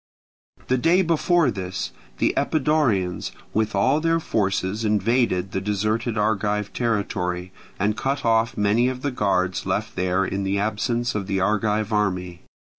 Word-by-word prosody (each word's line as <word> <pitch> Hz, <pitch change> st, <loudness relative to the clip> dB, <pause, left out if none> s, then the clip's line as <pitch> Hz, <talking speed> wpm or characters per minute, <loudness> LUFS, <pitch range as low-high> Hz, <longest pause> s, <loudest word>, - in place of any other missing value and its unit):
The 130 Hz, 0 st, +2 dB
day 175 Hz, +8 st, +4 dB
before 170 Hz, -1 st, +2 dB
this 95 Hz, -1 st, -4 dB
battle, -, -, -26 dB
the -, -, +2 dB
Epidaurians 130 Hz, -, +1 dB, 0.2 s
with 110 Hz, -1 st, 0 dB
all 100 Hz, +10 st, +3 dB
their 165 Hz, 0 st, +2 dB
forces 100 Hz, -, -1 dB
invaded 105 Hz, -3 st, +1 dB
the 95 Hz, -, -2 dB
deserted 110 Hz, +3 st, -1 dB
Argive 105 Hz, -1 st, 0 dB
territory, 95 Hz, -6 st, -1 dB, 0.3 s
and 105 Hz, +2 st, +1 dB
cut 135 Hz, +2 st, -2 dB
off 115 Hz, 0 st, +2 dB
many 105 Hz, +4 st, +3 dB
of 130 Hz, 0 st, -6 dB
the 145 Hz, -, 0 dB
guards 95 Hz, -5 st, 0 dB
left 110 Hz, +1 st, -2 dB
there 95 Hz, +1 st, +1 dB
in 95 Hz, +1 st, -2 dB
the 100 Hz, 0 st, 0 dB
absence 115 Hz, +4 st, -1 dB
of 100 Hz, -3 st, -3 dB
the 95 Hz, -1 st, 0 dB
Argive 105 Hz, +2 st, 0 dB
army. 90 Hz, -4 st, -1 dB
105 Hz, 150 wpm, -23 LUFS, 95-120 Hz, 0.3 s, day